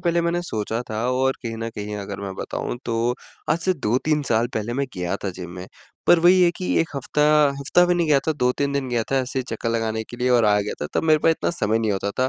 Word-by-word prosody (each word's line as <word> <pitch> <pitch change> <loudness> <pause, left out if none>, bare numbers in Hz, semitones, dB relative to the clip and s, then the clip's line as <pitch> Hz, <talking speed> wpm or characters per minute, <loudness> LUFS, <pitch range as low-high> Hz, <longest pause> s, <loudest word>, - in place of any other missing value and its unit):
पहले 170 0 +1
मैंने 170 +1 0
सोचा 110 -5 -3
था 110 +1 -2
और 130 +1 +2
कहीं 115 -1 -4
न 115 0 -4
कहीं 105 0 -5
अगर 100 -1 -6
मैं 100 -1 -5
बताऊँ 120 - -4
तो 115 +1 0 0.4
आज 155 - +3
से 185 +2 +1
2-3 145 +4 0
साल 115 +1 +2
पहले 110 +2 -2
मैं 140 - 0
गया 90 +2 -2
था 95 - -1
जिम 90 -1 -8
में, 90 +1 -8 0.4
पर 175 - +7
वही 180 +2 +6
है 175 - +5
कि 180 - -2
1 165 - 0
हफ्ता 145 +2 -1 0.4
हफ्ता 175 +6 +4
भी 180 - +2
नहीं 170 -2 +1
गया 145 -2 +5
था, - - +3
2-3 140 0 0
दिन 140 -2 -1
गया 120 -2 0
था - - +3
ऐसे 130 +1 -2
ही 130 - 0
चक्कर 115 +1 -3
लगाने 110 -1 -1
के 120 - -8
लिए 125 +1 0
और 120 -2 +4
आ 105 -1 +4
गया 105 - -3
था, 75 - -1
तब - - +1
मेरे 155 -1 +5
पास 165 - +3
इतना 160 - 0
समय 110 -10 0
नहीं 110 -2 0
होता 100 +1 -2
था 130 - +3
120 Hz, 270 wpm, -23 LUFS, 110-150 Hz, 0.4 s, पर